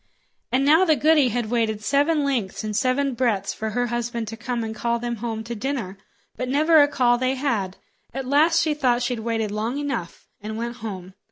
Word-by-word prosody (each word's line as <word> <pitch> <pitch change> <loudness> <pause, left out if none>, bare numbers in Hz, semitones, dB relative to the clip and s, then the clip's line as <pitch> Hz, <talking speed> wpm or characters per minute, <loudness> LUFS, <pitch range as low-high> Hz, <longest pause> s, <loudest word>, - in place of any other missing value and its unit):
And 260 +2 +2
now 315 +5 +6
the 320 -4 +4
goody 300 -2 +4
had 235 -1 -2
waited 220 -3 0
seven 290 +4 +2
lengths 245 -10 -2
and 215 -1 -3
seven 265 +3 +1
breadths 225 -5 0
for 220 - -4
her 245 +3 0
husband 240 -1 -3
to 225 - -6
come 235 +1 -3
and 220 0 -4
call 235 +2 -1
them 240 0 -4
home 220 0 -4
to 235 +2 -5
dinner; 235 -4 -3 0.4
but 255 0 -4
never 310 +3 +5
a 285 - +5
call 245 -4 +2
they 260 +1 0
had. 225 -9 -2 0.3
At 265 +1 -5
last 310 +5 +3
she 310 - +1
thought 250 -5 +1
she'd 245 -1 -1
waited 225 -2 -2
long 220 +5 -2
enough, 280 -12 -4 0.2
and 215 +1 -5
went 235 +1 -4
home. 190 -5 -7
240 Hz, 205 wpm, -23 LUFS, 220-275 Hz, 0.4 s, now